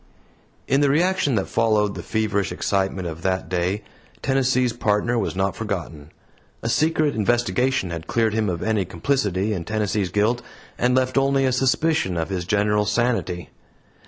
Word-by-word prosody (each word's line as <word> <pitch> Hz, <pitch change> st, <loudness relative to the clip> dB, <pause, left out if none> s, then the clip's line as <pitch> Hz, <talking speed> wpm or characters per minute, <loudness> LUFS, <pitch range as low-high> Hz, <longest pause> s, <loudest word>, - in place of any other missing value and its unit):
In 135 Hz, +2 st, +3 dB
the 145 Hz, -, +4 dB
reaction 160 Hz, -2 st, +2 dB
that 95 Hz, -, 0 dB
followed 110 Hz, -3 st, +2 dB
the -, -, -6 dB
feverish 105 Hz, -4 st, -1 dB
excitement 95 Hz, -2 st, -1 dB
of 80 Hz, 0 st, -7 dB
that 95 Hz, +1 st, -1 dB
day, 90 Hz, +3 st, -1 dB, 0.4 s
Tennessee's 130 Hz, -2 st, +2 dB
Partner 115 Hz, +1 st, +1 dB
was 100 Hz, -, -2 dB
not 95 Hz, +1 st, 0 dB
forgotten. 85 Hz, -8 st, -5 dB, 0.5 s
A 115 Hz, -, -1 dB
secret 155 Hz, +2 st, +2 dB
investigation 120 Hz, -1 st, +1 dB
had 80 Hz, -1 st, -6 dB
cleared 115 Hz, -2 st, +1 dB
him 110 Hz, -2 st, 0 dB
of 85 Hz, -2 st, -3 dB
any 110 Hz, -2 st, +1 dB
complicity 100 Hz, -1 st, -1 dB
in 90 Hz, -4 st, -3 dB
Tennessee's 105 Hz, -1 st, -1 dB
guilt, 105 Hz, +6 st, +1 dB, 0.3 s
and 125 Hz, +1 st, +1 dB
left 130 Hz, +1 st, +2 dB
only 135 Hz, 0 st, +2 dB
a 130 Hz, -, +2 dB
suspicion 130 Hz, -, +1 dB
of 80 Hz, +1 st, -2 dB
his 90 Hz, -3 st, -3 dB
general 105 Hz, +1 st, +1 dB
sanity. 105 Hz, -6 st, -1 dB
105 Hz, 160 wpm, -23 LUFS, 95-125 Hz, 0.5 s, the